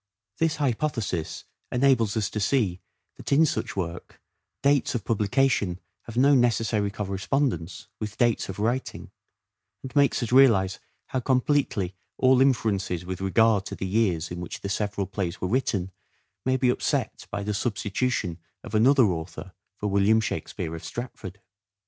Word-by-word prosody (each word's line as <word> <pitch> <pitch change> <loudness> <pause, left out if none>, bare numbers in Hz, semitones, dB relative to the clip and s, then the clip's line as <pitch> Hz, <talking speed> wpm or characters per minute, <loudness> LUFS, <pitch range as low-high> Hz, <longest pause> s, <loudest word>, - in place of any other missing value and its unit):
This 165 -1 +2
hypothesis 120 - -2 0.3
enables 125 -5 +3
us 105 -2 -1
to 105 - -3
see 100 -5 +1 0.4
that - - -7
in 150 +3 +6
such 125 -3 -2
work 85 -2 -5 0.4
dates 140 -2 +2
of 110 - -3
publication 105 -4 +1 0.3
have 115 0 -8
no 140 +3 +5
necessary 115 -4 +2
correspondence 100 - -2
with 105 -1 -5
dates 120 -4 +1
of 95 - -5
writing, 120 +5 -2 0.7
and 130 -2 -8
makes 140 -3 +3
us 120 - -4
realize 110 -8 +5 0.3
how 130 - -1
completely 125 -7 +1 0.2
all 130 0 +4
inferences 100 -9 +1
with 95 0 -5
regard 105 +1 +3
to - - -6
the - - -4
years 95 -5 0
in 90 0 -5
which 90 - -7
the 100 - -4
several 100 0 -1
plays 95 -3 -4
were 90 - -2
written 100 -5 0 0.5
may 130 0 +2
be 125 -1 +2
upset - - -2
by 100 - -4
the 105 +1 -2
substitution 105 -3 -1 0.2
of - - -10
another 130 +5 +5
author 80 -5 -4 0.2
for 105 - -7
William 100 +2 +3
Shakspere 85 -6 -4
of 80 - -9
Stratford. 105 -5 -7
110 Hz, 150 wpm, -26 LUFS, 95-130 Hz, 0.7 s, in